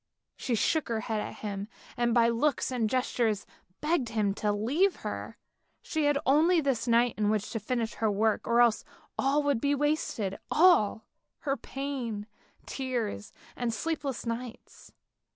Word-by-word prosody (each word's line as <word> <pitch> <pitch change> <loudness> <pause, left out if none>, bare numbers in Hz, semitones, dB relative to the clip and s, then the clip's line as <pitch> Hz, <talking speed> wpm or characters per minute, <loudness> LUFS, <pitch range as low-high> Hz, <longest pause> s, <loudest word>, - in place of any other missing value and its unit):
She 245 - -1
shook 315 +7 +1
her 230 -2 -1
head 215 -1 -2
at - - -6
him, 200 -1 -4 0.3
and 240 0 +1
by 230 0 +5
looks 255 +4 +1
and 235 -4 0
gestures 235 -4 0 0.4
begged 300 -6 +1
him 210 -3 +1
to 210 +1 0
leave 280 - +2
her. - - -5 0.5
She 315 -3 -1
had 290 -1 +3
only 325 +6 +4
this 265 -6 0
night 235 0 +4
in 210 -1 +2
which 215 -1 -1
to 225 - -2
finish 230 +1 -2
her 220 - 0
work, 215 +1 +1
or 235 +1 +4
else 235 -2 +3 0.3
all 285 +2 +2
would 285 -5 +1
be 285 0 +2
wasted, 280 - -1
all 305 - +4 0.2
— - - -54
her 275 -2 0
pain, 260 -7 -4 0.4
tears 240 - -3 0.2
and 240 -1 -1
sleepless 280 +1 -3
nights. 230 +1 -7
240 Hz, 160 wpm, -29 LUFS, 220-280 Hz, 0.5 s, by